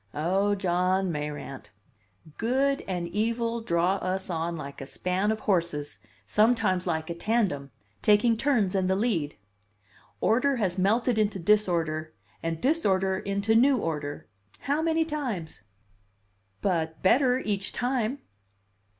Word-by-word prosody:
"Oh, 190 +7 +1
John 185 0 +1
Mayrant! 145 -6 -5 0.7
Good 270 +4 +1
and 175 -2 -2
evil 230 +2 -1
draw 180 -1 +1
us 190 0 -3
on 165 0 -2
like 140 -2 -8
a 135 - -6
span 185 +6 -1
of 220 0 -3
horses, 170 -7 -1 0.3
sometimes 210 -4 +2
like 160 +1 -1
a - - -1
tandem, 175 -7 0 0.3
taking 210 - +4
turns 225 -6 +1
in 190 -2 +1
the 190 - +2
lead. 190 -9 0 0.8
Order 265 +5 +2
has 190 -6 -1
melted 220 +4 +2
into 210 -2 +1
disorder, 170 -5 +1 0.3
and 165 -1 -2
disorder 195 - +1
into 200 +2 0
new 260 +4 +5
order 150 -7 -4 0.3
how 290 +3 0
many 325 0 +1
times?" 250 - -4 1.0
"But 160 -4 -1
better 250 +5 +4
each 200 -5 -2
time." 250 +1 -1
195 Hz, 125 wpm, -27 LUFS, 170-230 Hz, 1.0 s, new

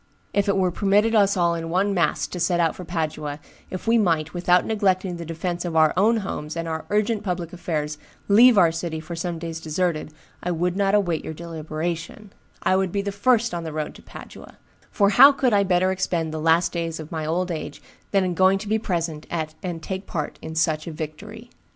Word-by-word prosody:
If 200 0 +1
it 200 - +2
were 185 -2 +2
permitted 205 +4 +2
us 200 -3 +4
all 170 -1 +2
in 165 -1 -4
one 195 +4 +1
mass 170 -5 +1
to 180 - -6
set 175 0 +1
out 165 -2 +2
for 180 - -8
Padua, 155 -4 -3 0.3
if 185 - -6
we 230 +1 +4
might, 165 -6 +1
without 180 0 +3
neglecting 190 -4 0
the 170 - -7
defence 170 +2 -3
of 170 -2 -4
our 155 -1 +5
own 215 +5 +3
homes 155 -3 -5
and 165 0 -3
our 160 -1 -4
urgent 210 +1 +1
public 180 -3 -3
affairs, 150 -4 -3 0.3
leave 230 +3 +7
our 170 -4 +6
city 165 -1 -4
for 165 +2 -7
some 170 0 -3
days 165 0 -5
deserted, 160 -1 -1 0.3
I 180 - -3
would 175 +1 0
not 200 0 +2
await 175 -6 +1
your 160 - -6
deliberation; 165 +4 -5 0.3
I 185 - +3
would 190 -2 0
be 200 +1 -1
the 200 - -2
first 230 +3 +2
on 170 -1 -3
the 160 - -5
road 155 0 -4
to - - -14
Padua; - - -12 0.3
for 200 -2 +3
how 270 +7 +9
could 260 -4 +1
I 200 - +5
better 185 -1 +2
expend 170 -4 -1
the 160 - -3
last 165 +2 +3
days 165 -2 -3
of 155 -1 -9
my 160 -2 -3
old 175 +3 -1
age 160 - -5 0.3
than 195 -2 +2
in 180 -1 -1
going 190 +2 +4
to 210 +2 -8
be 220 +1 +1
present 165 -6 -3
at 155 -2 -3
and 170 -3 -5
take 190 +2 -5
part 155 -4 -4
in 160 - -7
such 155 -1 0
a - - -4
victory? 205 +10 -8
175 Hz, 220 wpm, -23 LUFS, 160-195 Hz, 0.3 s, how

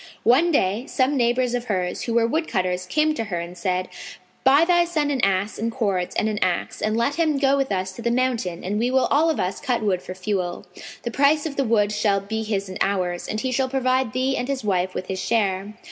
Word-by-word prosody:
One 275 +9 +4
day, 210 - +1
some 265 +1 +1
neighbours 245 0 +1
of 245 0 -2
hers, 185 -5 -2
who 235 - -2
were 235 -1 +4
woodcutters, 185 - -1
came 305 +8 +2
to 225 -7 -3
her 180 -5 -3
and 170 +1 -7
said, 185 +1 -1 0.6
"Buy 280 +5 +6
thy 345 0 +4
son 310 -4 -1
an 265 -3 0
ass 195 +1 +1
and 230 +2 -1
cords 200 -7 -1
and 220 - +1
an 210 -1 -2
axe 180 -2 -1
and 215 +1 0
let 280 +7 0
him 310 -3 +2
go 275 0 +3
with 275 -3 -1
us 185 -1 -1
to 210 - -10
the 235 - 0
mountain 235 -8 -1
and 205 +3 -2
we 240 +2 +1
will 260 0 +3
all 315 +3 +4
of 320 - -1
us 185 +1 -2
cut 250 -5 -1
wood 190 -4 +1
for 185 - -8
fuel. 185 -2 -3 0.4
The 235 - -3
price 285 +5 +3
of 300 -3 -4
the 275 - +1
wood 215 -4 +2
shall 210 -1 +1
be 220 +3 -4
his 205 -3 -2
and 185 - -7
ours, 180 -3 0
and 215 0 -3
he 260 - -1
shall 260 +1 0
provide 255 -2 +1
thee 260 +2 0
and 245 - -2
his 275 -3 -2
wife 185 -2 0
with 185 - -3
his 190 0 -4
share." 205 -2 0
225 Hz, 240 wpm, -23 LUFS, 190-265 Hz, 0.6 s, Buy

